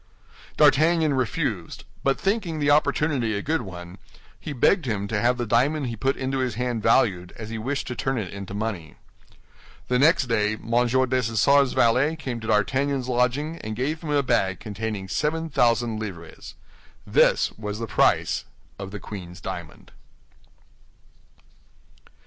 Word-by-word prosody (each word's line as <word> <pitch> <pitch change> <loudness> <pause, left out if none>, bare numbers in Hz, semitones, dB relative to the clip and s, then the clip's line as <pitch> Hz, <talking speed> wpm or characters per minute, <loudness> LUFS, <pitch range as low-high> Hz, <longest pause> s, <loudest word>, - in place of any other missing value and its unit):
D'Artagnan 155 +2 +4
refused; 130 -5 -2 0.2
but 135 0 +1
thinking 195 -5 -1
the 145 -1 +2
opportunity 145 -5 +1
a 100 - -4
good 160 +2 0
one, 90 0 -9 0.4
he - - -6
begged 145 +6 +2
him 100 -3 -2
to 105 -1 -1
have 120 +1 +2
the 120 - -2
diamond 135 +7 +1
he 120 -2 -4
put 135 +5 -1
into 135 0 -2
his 130 -2 -1
hand 125 -2 -2
valued, 100 -6 +2
as 110 -1 -7
he 110 - -4
wished 135 +5 -2
to 125 - -5
turn 135 +1 -1
it 100 -5 -4
into 100 0 -7
money. 100 -8 -4 0.9
The 125 0 +2
next 155 0 +4
day, 105 -3 +1
M. 110 +1 -8 0.2
Dessessart's 130 +1 +2
valet 130 +7 +3
came 130 -6 -5
to 110 - -8
D'Artagnan's 130 +5 +1
lodging, 130 +6 0
and 110 0 -5
gave 145 +7 -2
him 160 - -6
a 145 -1 +2
bag 95 -7 +1
containing 105 -2 -5
seven 160 +8 -1
thousand 115 -3 +2
livres. 90 -7 -8 0.5
This - - +3
was 105 -1 -6
the 115 - -3
price - - +1 0.3
of 95 -1 -6
the 105 +1 -7
queen's 90 -3 -9
diamond. 85 -4 -8
120 Hz, 155 wpm, -24 LUFS, 105-140 Hz, 0.9 s, D'Artagnan